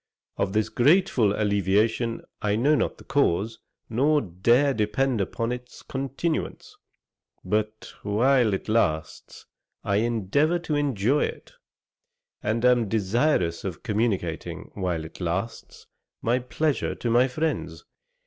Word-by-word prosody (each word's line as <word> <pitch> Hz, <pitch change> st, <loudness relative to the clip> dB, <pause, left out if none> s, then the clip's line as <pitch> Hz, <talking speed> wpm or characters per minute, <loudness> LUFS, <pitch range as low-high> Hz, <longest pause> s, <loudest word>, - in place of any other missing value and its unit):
Of 100 Hz, -1 st, -1 dB
this 110 Hz, 0 st, +1 dB
grateful 135 Hz, -, +3 dB
alleviation 105 Hz, +3 st, +1 dB, 0.2 s
I 105 Hz, -1 st, +1 dB
know 135 Hz, +7 st, +3 dB
not 150 Hz, -, 0 dB
the -, -, -14 dB
cause, 115 Hz, -6 st, 0 dB, 0.3 s
nor 145 Hz, +7 st, +2 dB
dare 120 Hz, +8 st, +2 dB
depend 115 Hz, +2 st, 0 dB
upon 115 Hz, +4 st, -2 dB
its 125 Hz, 0 st, -8 dB
continuance, 135 Hz, +5 st, -3 dB, 0.7 s
but 105 Hz, +3 st, -2 dB
while 115 Hz, +1 st, +3 dB
it -, -, -7 dB
lasts 80 Hz, -9 st, -1 dB, 0.4 s
I 100 Hz, -, +1 dB
endeavour 120 Hz, -, +1 dB
to 170 Hz, -3 st, -4 dB
enjoy 140 Hz, -1 st, +1 dB
it, -, -, -8 dB, 0.9 s
and 115 Hz, +3 st, 0 dB
am 120 Hz, -4 st, +4 dB
desirous 105 Hz, -, +1 dB
of 90 Hz, -5 st, -5 dB
communicating, 105 Hz, -7 st, -2 dB
while 90 Hz, -5 st, -2 dB
it 80 Hz, -, -12 dB
lasts, 90 Hz, +6 st, -4 dB, 0.3 s
my 120 Hz, +2 st, +1 dB
pleasure 145 Hz, +4 st, -1 dB
to 120 Hz, -, -2 dB
my 125 Hz, +3 st, +5 dB
friends. 155 Hz, +5 st, -3 dB
115 Hz, 120 wpm, -25 LUFS, 100-135 Hz, 0.9 s, my